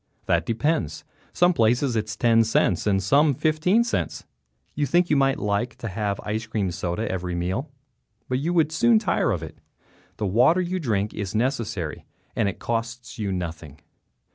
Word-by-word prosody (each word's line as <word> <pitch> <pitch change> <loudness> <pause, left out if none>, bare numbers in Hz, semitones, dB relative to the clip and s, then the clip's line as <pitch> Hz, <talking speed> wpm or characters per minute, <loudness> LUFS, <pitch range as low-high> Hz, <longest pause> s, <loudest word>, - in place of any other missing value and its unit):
That 85 -1 +1
depends; 115 - -1 0.3
some 180 0 +3
places 120 +1 +2
it 110 -1 0
is 110 -1 -6
ten 115 +1 +4
cents 110 -4 +1
and 95 -2 +2
some 140 - +4
fifteen 160 - +2
cents. 80 - -3 0.5
You 145 0 -1
think 175 +5 +2
you - - +5
might 135 -1 +3
like 105 +4 -1
to 115 - -6
have 100 0 -2
ice 110 +2 -3
cream 105 -5 -1
soda 90 +5 -3
every 90 -2 -3
meal, 95 - -2 0.6
but 130 0 0
you 160 +5 -1
would 160 -3 +2
soon 225 +8 +4
tire 215 -4 +1
of 85 -5 -1
it. 80 - -10 0.6
The 105 - -2
water 125 - +4
you 185 +1 -1
drink 105 - -1
is 100 0 -4
necessary, 110 - -2 0.3
and 105 - +1
it - - -7
costs 115 +1 -4
you 100 -2 -1
nothing. 80 -5 -5
115 Hz, 175 wpm, -24 LUFS, 95-145 Hz, 0.6 s, you